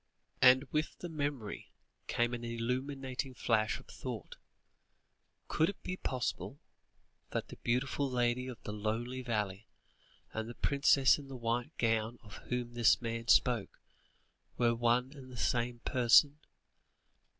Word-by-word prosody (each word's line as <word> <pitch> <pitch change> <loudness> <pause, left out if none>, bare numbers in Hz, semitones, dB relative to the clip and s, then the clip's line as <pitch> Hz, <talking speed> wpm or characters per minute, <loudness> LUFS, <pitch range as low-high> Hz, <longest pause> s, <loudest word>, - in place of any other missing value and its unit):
And 130 +1 +7
with 155 0 -1
the 175 - -6
memory, 145 -8 -4 0.4
came 120 +1 +1
an 120 0 -4
illuminating 130 +3 -3
flash 110 -3 +1
of - - -15
thought. - - -7 1.1
Could 160 +2 +2
it 200 - -8
be 185 - -3
possible 135 -1 -3 0.7
that - - -3
the - - -10
beautiful 135 +3 0
lady 125 0 0
of 125 -3 -6
the 105 - -5
lonely 115 +5 -2
valley, 105 -4 -2 0.7
and 110 +1 -3
the 120 - -8
princess 140 -1 +4
in 140 - -10
the 135 - -8
white 120 +5 -2
gown, 115 0 +1
of 105 -4 -11
whom 125 -1 -2
this 120 -2 +4
man 115 -1 -4
spoke, 115 -2 +3 0.8
were 120 -1 +3
one 120 +2 +2
and 130 -2 -11
the 125 - -9
same 120 +1 0
person? 130 +4 +5
120 Hz, 140 wpm, -33 LUFS, 115-130 Hz, 1.1 s, And